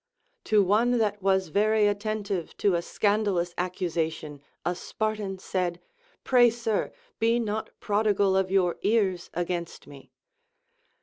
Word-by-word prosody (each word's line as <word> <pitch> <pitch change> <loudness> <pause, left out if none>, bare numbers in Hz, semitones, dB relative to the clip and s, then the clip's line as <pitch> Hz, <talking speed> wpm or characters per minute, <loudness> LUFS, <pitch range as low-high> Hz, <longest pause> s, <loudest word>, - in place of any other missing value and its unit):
To 210 -2 +4
one 230 +6 +3
that 210 -2 0
was 190 -2 +1
very 215 +4 +3
attentive 205 -3 -2
to 200 - +2
a 170 - +1
scandal 205 +1 0
ous 175 0 -1
accusation 160 -5 -3 0.2
a 175 - +1
Spartan 210 +1 -3
said, 180 -2 -2 0.4
Pray, 245 -2 +5
sir, 225 -2 -2 0.3
be 230 +1 +3
not 220 -1 -3
prodigal 205 -2 +2
of 190 -1 +1
your 185 -2 +1
ears 200 -4 +1
against 175 -1 -3
me. 140 -2 -14
200 Hz, 130 wpm, -27 LUFS, 180-215 Hz, 0.4 s, Pray